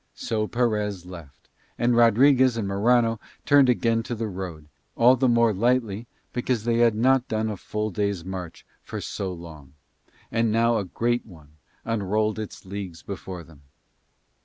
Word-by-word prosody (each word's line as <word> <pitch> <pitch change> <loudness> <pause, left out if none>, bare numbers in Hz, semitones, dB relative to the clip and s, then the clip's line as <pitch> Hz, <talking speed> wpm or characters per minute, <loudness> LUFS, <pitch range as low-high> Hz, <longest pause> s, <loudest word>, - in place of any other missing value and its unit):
So 110 -1 -2
Perez 105 -6 -1
left 85 -7 -12 0.3
and 120 0 +2
Rodriguez 125 +2 +5
and 105 -3 -2
Morano 115 +3 +2 0.3
turned 140 -3 +5
again 115 -2 +2
to 120 +1 -5
the 115 0 -3
road, 90 -6 -7 0.3
all 125 +2 +6
the 130 +1 +1
more 115 -2 +4
lightly 115 0 0 0.3
because 120 -2 -1
they 115 0 +1
had 115 -2 +4
not 130 +3 +3
done 110 0 -1
a - - -4
full 105 +3 -4
day's 100 -2 -2
march 90 -3 -7 0.2
for - - -6
so 95 -2 -4
long, 80 -6 -11 0.6
and 115 -1 +1
now 115 +1 +3
a 100 - -3
great 120 +6 -1
one 75 -6 -17 0.3
unrolled 110 0 0
its 110 -3 -7
leagues 95 -4 -7
before 95 -3 -7
them. 80 -3 -18
110 Hz, 160 wpm, -25 LUFS, 95-120 Hz, 0.6 s, all